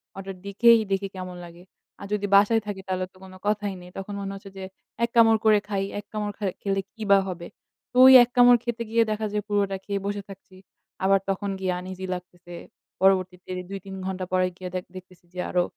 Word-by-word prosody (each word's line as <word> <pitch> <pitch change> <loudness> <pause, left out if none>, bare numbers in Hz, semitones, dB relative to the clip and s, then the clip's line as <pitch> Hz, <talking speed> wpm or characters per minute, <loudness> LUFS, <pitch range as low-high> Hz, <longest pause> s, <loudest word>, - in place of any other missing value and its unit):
হঠাৎ 195 0 -7
দেখেই 230 +3 +5
দেখি 195 0 0
কেমন 185 -1 -6
লাগে। 170 +1 -14 0.4
আর 200 - -8
যদি 205 -1 -1
বাসায় 220 +3 +5
থাকি 195 -2 -5
তাহলে 185 0 -1
তো - - -21
কোন 190 0 -12
কথাই 205 -1 0
নেই। 180 - -12
তখন 195 +1 -6
মনে 195 0 -4
হচ্ছে 195 0 -11
যে 190 - -6 0.4
এক 235 - +2
কামড় 225 -1 +6
করে 215 -1 +6
খাই, 195 -2 -1 0.2
এক 205 - -10
কামড় 210 -1 -3
খা 205 - -4 0.2
খেলে 195 -1 0
কি 225 - -15
বা 200 - +8
হবে? 175 -2 -6 0.4
তো - - -25
ওই 265 - +10
এক 240 - -4
কামড় 245 0 +7
খেতে 235 -1 -3
গিয়ে 230 0 +3
দেখা 215 0 -2
যে 210 - +1
পুরোটা 200 -2 0
খেয়ে 200 -1 -2
বসে 205 0 -2
থাকছি। 195 -1 -13 0.5
আবার 195 0 +4
তখন 195 +1 -1
গিয়ে 185 -1 -1
আনইজি 185 +1 -7
লাগতেছে। 180 -1 -10 0.5
পরবর্তীতে 185 -1 +2 0.2
২ 195 0 -5
৩ 190 0 -7
ঘণ্টা 185 -1 -3
পরে 185 0 +3
গিয়ে 185 -1 -6 0.3
দেখতেছি 185 -1 -13
যে 180 - -7
আরও 180 -1 +2
195 Hz, 210 wpm, -25 LUFS, 185-210 Hz, 0.5 s, ওই